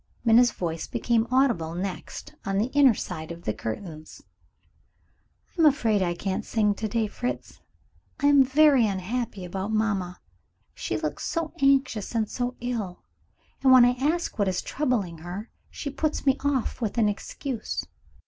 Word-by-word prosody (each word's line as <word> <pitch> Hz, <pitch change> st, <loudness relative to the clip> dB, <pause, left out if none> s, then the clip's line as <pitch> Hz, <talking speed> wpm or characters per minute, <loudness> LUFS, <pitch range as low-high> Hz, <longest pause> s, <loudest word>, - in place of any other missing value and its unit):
Minna's 235 Hz, +2 st, +6 dB
voice 165 Hz, -6 st, -4 dB
became 235 Hz, -1 st, +1 dB
audible 235 Hz, -11 st, +2 dB
next, 185 Hz, +1 st, -5 dB
on 195 Hz, 0 st, -1 dB
the 225 Hz, +6 st, 0 dB
inner 275 Hz, -5 st, +6 dB
side 160 Hz, -4 st, -5 dB
of 170 Hz, 0 st, -9 dB
the 110 Hz, -, -1 dB
curtains. 155 Hz, -, -7 dB, 1.3 s
"I 345 Hz, -, 0 dB
am 315 Hz, -, +8 dB
afraid 225 Hz, -8 st, +2 dB
I 175 Hz, -2 st, 0 dB
can't 190 Hz, +2 st, -2 dB
sing 210 Hz, -2 st, +1 dB
to 220 Hz, +2 st, -3 dB
day, 225 Hz, +1 st, 0 dB
Fritz. 245 Hz, +4 st, -5 dB, 0.6 s
I 285 Hz, -, 0 dB
am 285 Hz, -1 st, +7 dB
very 270 Hz, -3 st, +5 dB
unhappy 200 Hz, +1 st, -3 dB
about 190 Hz, +3 st, -4 dB
mamma. 205 Hz, -5 st, -1 dB, 0.5 s
She -, -, -3 dB
looks -, -, -4 dB
so 330 Hz, -2 st, -2 dB
anxious 265 Hz, -6 st, +2 dB
and 220 Hz, -2 st, +1 dB
so 245 Hz, +2 st, -3 dB
ill; 225 Hz, -7 st, -4 dB, 0.6 s
and 265 Hz, -, +5 dB
when 255 Hz, -2 st, +9 dB
I 245 Hz, -, +5 dB
ask 310 Hz, -2 st, -1 dB
what 200 Hz, -, +2 dB
is 185 Hz, -1 st, -1 dB
troubling 225 Hz, -, -1 dB
her, 180 Hz, +7 st, -7 dB, 0.2 s
she 285 Hz, -, -6 dB
puts 305 Hz, +2 st, -2 dB
me 270 Hz, -1 st, +4 dB
off 270 Hz, -3 st, -1 dB
with 220 Hz, 0 st, -2 dB
an 225 Hz, -2 st, +4 dB
excuse." 230 Hz, +4 st, -4 dB
225 Hz, 160 wpm, -26 LUFS, 190-260 Hz, 1.3 s, when